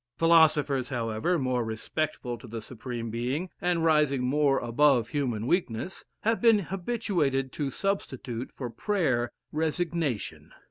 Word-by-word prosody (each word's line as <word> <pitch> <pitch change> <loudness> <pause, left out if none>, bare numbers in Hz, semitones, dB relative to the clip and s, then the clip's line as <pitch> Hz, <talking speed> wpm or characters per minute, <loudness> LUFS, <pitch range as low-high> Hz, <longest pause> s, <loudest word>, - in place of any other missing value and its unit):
Philosophers, 155 -5 +4
however, 115 +7 0
more 130 -4 0
respectful 120 +3 -3
to 120 +1 -12
the 115 0 -5
Supreme 115 0 -6
Being, 130 +10 -2
and 175 -3 +1
rising 150 -5 +3
more 140 +1 +3
above 120 0 +3
human 125 -7 -1
weakness, 175 0 -1 0.2
have 225 +1 +1
been 230 -2 +6
habituated 175 - -1
to 145 -3 -2
substitute, 130 - -3
for 125 -3 -5
prayer, 130 - 0 0.2
resignation. 160 - -2
140 Hz, 125 wpm, -28 LUFS, 120-165 Hz, 0.2 s, been